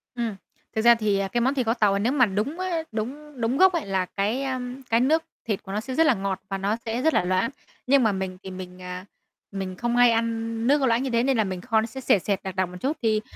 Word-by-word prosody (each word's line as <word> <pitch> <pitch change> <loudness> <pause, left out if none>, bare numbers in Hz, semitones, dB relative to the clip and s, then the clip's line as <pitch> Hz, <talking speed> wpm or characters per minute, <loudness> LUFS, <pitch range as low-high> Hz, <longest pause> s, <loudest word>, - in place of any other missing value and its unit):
Ừm, 230 -3 -2 0.4
thực 220 - +1
ra 235 +1 +7
thì, 215 -3 +1
à, 195 - 0
cái 235 +5 -1
món 265 +3 +2
thịt 255 -4 -1
kho 225 - +2
tàu 210 -4 +3
à 200 - 0
nếu 230 +5 +1
mà 265 -3 +4
đúng 220 - -2
á, 360 -3 -1
đúng 265 +5 -6
đúng 230 +4 +1
gốc 375 +2 +6
ấy 335 - -1
là 190 -2 0
cái, 205 +8 -1
a, 260 -1 -2 0.3
cái 230 - +4
nước 310 +6 +3 0.2
thịt 210 -4 -2
của 195 - -8
nó 205 - -1
sẽ 260 +3 -6
rất 325 - +4
là 310 - +5
ngọt 195 -1 -3
và 195 - -2
nó 200 +3 0
sẽ 230 +2 -2
rất 320 +3 +3
là - - +3
loãng. 185 +5 +1 0.4
Nhưng 270 0 +5
mà 220 - +3
mình 190 -1 -4
thì 190 - -7
mình, 185 0 -9
à, 180 +1 -7 0.5
mình 190 -2 -4
không 240 +3 -1
hay 245 -1 +6
ăn 230 0 -1
nước 290 +2 +4
có 270 - +2
loãng 235 +1 +2
như 270 - -2
thế 235 -1 +2
nên 265 -1 +2
là 220 - +3
mình 185 -2 -4
kho 225 -1 +2
nó - - -2
sẽ 265 +3 -8
sệt 205 -7 +3
sệt, 200 -2 -1
đặc 190 -1 -5
đặc 185 -2 0
một 180 - -9
chút. 285 +4 -1
Thì 220 -2 +2
225 Hz, 290 wpm, -25 LUFS, 195-255 Hz, 0.5 s, ra